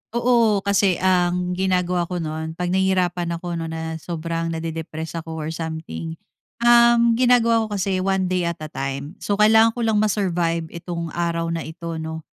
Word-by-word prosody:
Oo, 230 -4 +3
kasi 200 -2 +3
ang 180 -1 +2
ginagawa 180 -1 0
ko 180 - -5
nun. 160 +1 -4
Pag 180 +1 -2
nahihirapan 180 -2 +1
ako 170 0 -4
no 165 - -4
na 160 0 -5
sobrang 165 0 -3
nade-depress 160 0 -5
ako 160 0 -7
or 155 0 -4
something, 160 0 -5 0.5
um, 235 0 +6
ginagawa 230 -3 +4
ko 210 - -4
kasi 190 -1 0
one 190 0 +1
day 180 -2 +1
at 170 - -2
a 155 - -7
time. 140 +3 -5
So 205 - -1
kailangan 220 +2 +5
ko 240 - -2
lang 220 -2 +2
ma-survive 175 -6 0
itong 170 -1 -5
araw 170 -1 -1
na 165 - -2
ito 165 0 -6
no 160 0 -6
175 Hz, 170 wpm, -22 LUFS, 165-195 Hz, 0.5 s, um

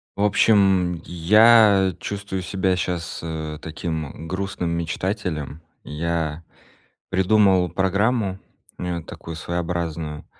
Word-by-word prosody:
В 100 - -1
общем, 95 -4 +3
я 100 +2 +5
чувствую 100 -2 -4
себя 95 0 0
щас, 85 -2 -3
э, 80 -2 -5
таким, 80 -1 -4
э, 80 +3 -10
грустным 95 -1 -3
мечтателем. 85 -2 -3 0.2
Я 80 +1 -3 0.7
придумал 95 -1 +3
программу, 100 +1 0 0.4
э, 90 -1 -3
такую 85 +1 -9
своеобразную. 85 -2 -4
90 Hz, 100 wpm, -22 LUFS, 80-100 Hz, 0.7 s, я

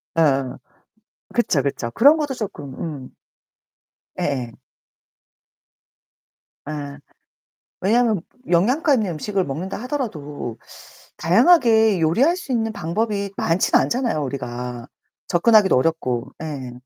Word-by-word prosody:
어어어. 135 -5 +2 0.8
그쵸, 205 - +1
그쵸. 130 -3 -3
그런 285 - +6
것도 295 -4 -2
쪼끔 190 - -6
음. 145 -6 -6 1.0
예예. 125 -5 -2 2.2
예. 145 -2 -6 0.8
왜냐하면 220 -1 +2 0.3
영양가 255 - +3
있는 215 -7 -1
음식을 195 +4 -1
먹는다 165 +8 -4
하더라도 155 - -4 0.6
다양하게 220 - +4
요리할 235 - +3
수 355 -8 -6
있는 225 -2 0
방법이 200 +2 -2
많진 165 +3 0
않잖아요, 235 - +1
우리가. 125 -1 -5 0.4
접근하기도 200 - +4
어렵고. 130 -3 0
예. 140 -6 -6
175 Hz, 240 characters per minute, -21 LUFS, 140-230 Hz, 2.2 s, 그런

